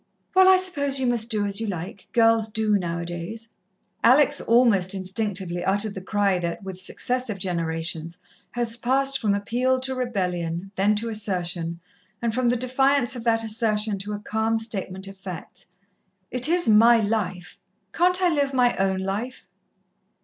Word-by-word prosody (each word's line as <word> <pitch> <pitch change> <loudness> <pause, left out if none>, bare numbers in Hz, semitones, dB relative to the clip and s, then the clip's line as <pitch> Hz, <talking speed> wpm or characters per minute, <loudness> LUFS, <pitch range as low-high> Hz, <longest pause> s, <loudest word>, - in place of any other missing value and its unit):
"Well, 375 0 +6
I 375 - +7
suppose 285 -7 0
you 260 - 0
must 240 -2 -1
do 210 -3 0
as 200 +1 -1
you 225 - -2
like 185 0 -6
girls 225 -1 +3
do, 215 -1 0
now 170 -4 -2
a - - -5
days." 175 +7 -7 0.5
Alex 285 +4 +5
almost 220 -6 +3
instinctively 190 -2 -1
uttered 205 +2 0
the 190 - -7
cry 200 -1 0
that, 170 +3 -4
with 190 -1 -7
successive 245 +3 -3
generations, 165 -2 -3 0.4
has 235 -2 -1
passed 270 +3 +1
from 205 -3 +1
appeal 250 +6 0
to 260 0 0
rebellion, 185 -7 -3
then 205 +2 +2
to 230 +2 -1
assertion, 175 -6 -2 0.4
and 230 -2 -1
from 250 0 +1
the 245 - +2
defiance 260 +1 +1
of 240 - -6
that 225 -1 +2
assertion 215 -2 0
to 205 +2 -5
a - - -3
calm 220 +2 -1
statement 195 -4 -3
of 195 0 -11
facts. 185 -3 -9 0.6
"It 250 +4 +2
is 350 +1 +3
my 230 +2 +6
life. 205 -4 -3 0.3
Can't 360 +2 +2
I 360 - +4
live 285 -4 0
my 245 -1 +3
own 190 0 0
life?" 210 +7 -4
215 Hz, 165 wpm, -24 LUFS, 190-245 Hz, 0.6 s, I